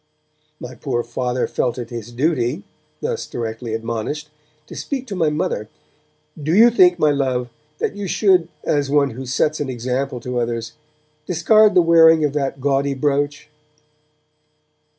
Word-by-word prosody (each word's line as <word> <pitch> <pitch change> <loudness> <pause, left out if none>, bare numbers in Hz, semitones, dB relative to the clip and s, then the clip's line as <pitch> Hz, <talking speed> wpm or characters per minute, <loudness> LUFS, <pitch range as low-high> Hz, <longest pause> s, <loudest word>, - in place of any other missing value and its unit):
My 125 - -8
poor 120 -1 -2
Father 125 +1 -2
felt 125 -1 -2
it 120 -1 -6
his 120 -1 -7
duty, 135 +3 0 0.4
thus 465 0 -3
directly 115 -1 -4
admonished, 115 +7 -4 0.3
to - - -11
speak 265 -2 -4
to 205 - -6
my 165 -4 +2
mother. 130 -8 -2 0.7
'Do 155 +4 0
you 220 - +8
not - - -14
think, 180 -5 +5
my 150 - +3
Love, 130 -3 -1 0.3
that - - -2
you 205 -1 -4
should, 185 -3 +3 0.2
as 145 -2 0
one 140 -1 +2
who 130 +3 -8
sets 150 +4 0
an 145 -2 -3
example 130 +1 -3
to 125 +1 -3
others, 115 -1 -3 0.5
discard 205 +4 +4
the 180 - +6
wearing 165 -1 +6
of 145 - -1
that 140 -2 -2
gaudy 140 +1 0
brooch?' 145 +2 -1
140 Hz, 155 wpm, -20 LUFS, 125-160 Hz, 0.7 s, you